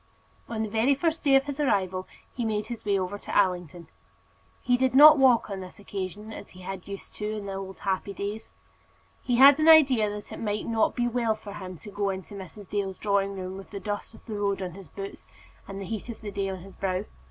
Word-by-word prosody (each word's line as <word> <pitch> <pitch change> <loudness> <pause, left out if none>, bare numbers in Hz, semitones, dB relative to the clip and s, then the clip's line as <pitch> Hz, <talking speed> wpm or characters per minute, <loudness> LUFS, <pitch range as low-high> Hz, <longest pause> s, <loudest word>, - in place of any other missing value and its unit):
On 220 -1 -2
the - - -2
very 225 +6 +2
first 325 +2 -1
day 275 -2 +5
of 270 - +5
his 285 0 -5
arrival 190 -9 0 0.3
he 245 - -3
made 215 -1 -1
his 235 -2 -6
way 200 -1 +2
over 190 +2 -3
to - - -3
Allington. 180 -4 0 0.7
He 245 - +2
did 260 +1 +1
not 300 +1 +10
walk 255 -3 +5
on 195 -2 -5
this 185 -1 -9
occasion 205 +2 -6
as - - -9
he 185 - -14
had 190 0 -7
used 200 -1 -8
to 210 0 -3
do - - -3
in 205 - -6
the 195 - -4
old 195 0 -7
happy 195 0 -1
days. 205 +3 -5 0.7
He 245 - 0
had 275 +4 +8
an 310 +1 +5
idea 270 -9 +7
that 205 0 -7
it - - -7
might 210 -1 -2
not 225 -1 +1
be 240 -1 +1
well 235 -2 +1
for 205 -2 -10
him 185 -3 -7
to 205 - -11
go 200 0 -1
into 190 +1 -5
Mrs. 195 +1 -9
Dale's 195 -2 -2
drawing 200 -1 0
room 185 0 -5
with 195 - -10
the 200 - -6
dust 205 +1 -5
of - - -18
the 225 - -6
road 200 -1 0
on 185 -2 -4
his 190 +1 -11
boots, 195 0 -8 0.4
and 195 0 -6
the 195 - -5
heat 220 +4 -5
of 230 - -7
the 210 -2 -6
day 195 -1 -2
on 190 -2 -6
his 195 0 -13
brow. 185 0 -1
205 Hz, 245 wpm, -27 LUFS, 195-230 Hz, 0.7 s, not